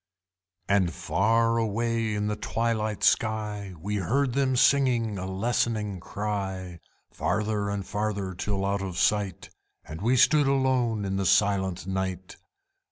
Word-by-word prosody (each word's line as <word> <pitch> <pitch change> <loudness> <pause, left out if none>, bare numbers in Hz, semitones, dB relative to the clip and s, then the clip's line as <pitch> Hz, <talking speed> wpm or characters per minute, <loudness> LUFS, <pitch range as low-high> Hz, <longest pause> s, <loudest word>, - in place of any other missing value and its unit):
And 95 -3 +2
far 115 +8 +1
away 115 0 -1
in 105 0 -1
the 105 0 -1
twilight 110 -1 -2
sky 105 -4 0
We 105 +5 -3
heard 125 +7 0
them 135 -1 +1
singing 120 -6 +3
a 95 - -4
lessening 105 0 -1
cry, 95 -3 -4 0.3
Farther 105 -1 -1
and 100 -1 -3
farther, 100 -2 -2
till 95 +2 -2
out 100 0 0
of 95 -2 -5
sight, 105 -3 0 0.3
And 80 +2 -8
we 120 +5 +2
stood 145 +3 +5
alone 130 -6 +1
in 95 0 -2
the 95 - -1
silent 95 -2 +2
night! 95 -1 -4
105 Hz, 135 wpm, -27 LUFS, 95-115 Hz, 0.3 s, stood